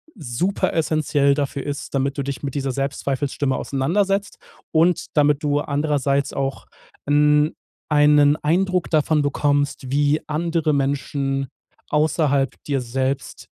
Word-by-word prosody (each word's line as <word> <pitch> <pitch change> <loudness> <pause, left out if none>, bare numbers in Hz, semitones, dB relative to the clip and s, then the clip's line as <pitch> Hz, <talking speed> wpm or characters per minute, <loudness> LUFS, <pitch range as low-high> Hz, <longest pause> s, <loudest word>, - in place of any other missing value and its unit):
superessentiell 155 -1 0
dafür 140 -2 -2
ist, 145 0 -5
damit 135 +1 -1
du 140 - -1
dich 140 -3 -5
mit 140 -1 -4
dieser 135 -2 -1
Selbstzweifelsstimme 140 0 -2
auseinandersetzt 195 +9 -1 0.3
und 165 +2 +2
damit 150 0 +3
du 145 0 +1
andererseits 140 -2 0
auch 135 0 -3 0.4
'n 150 +1 +3 0.4
einen 150 0 +5
Eindruck 180 +3 0
davon 155 -1 +2
bekommst, 145 -2 0
wie 145 +2 +2
andere 160 0 0
Menschen 135 -1 -1 0.4
außerhalb 150 -2 +1
dir 140 -3 -1
selbst, 130 +3 -3
145 Hz, 115 wpm, -21 LUFS, 140-155 Hz, 0.4 s, einen